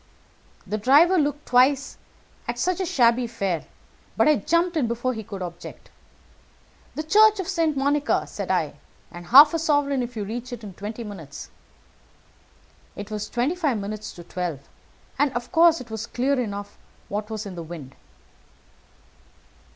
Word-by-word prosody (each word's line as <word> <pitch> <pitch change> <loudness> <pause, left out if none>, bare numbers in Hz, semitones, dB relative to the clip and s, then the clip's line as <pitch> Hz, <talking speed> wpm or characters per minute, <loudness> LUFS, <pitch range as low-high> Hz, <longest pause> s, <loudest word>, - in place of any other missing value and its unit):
The 210 +2 -3
driver 310 - +5
looked 290 0 -1
twice 260 +3 +2 0.5
at - - -3
such 365 0 0
a 370 - -1
shabby 240 -3 +3
fare; 195 -8 -2 0.5
but - - +4
I 305 - +5
jumped 335 - +1
in 285 -7 +1
before 240 +2 -1
he 220 - -5
could 195 -2 -7
object. 175 -1 -9 1.0
'The 310 - -3
Church 425 +5 +5
of 375 - -3
St. 330 -6 0
Monica,' 285 +2 +1
said - - -6
I, - - 0 0.4
'and 175 0 -10
half 285 - +9
a 330 - 0
sovereign 290 -4 +1
if 245 0 -5
you 210 - -2
reach 240 +5 -6
it 235 -2 -8
in 200 -3 -8
twenty 215 +5 -6
minutes.' 165 -9 -9 1.4
It 205 +1 -8
was 210 -1 -4
twenty 245 +7 0
five 305 -10 0
minutes 210 +1 -5
to 175 - -11
twelve, 175 -4 -4 0.6
and 290 -1 +3
of 240 0 -5
course 335 -1 +5
it 240 -3 -11
was 220 +1 -5
clear 260 +3 0
enough 205 -4 -5 0.3
what 210 +1 -4
was 220 -1 -5
in 200 - -7
the 175 - -6
wind. 160 -5 -9
240 Hz, 165 wpm, -24 LUFS, 205-295 Hz, 1.4 s, half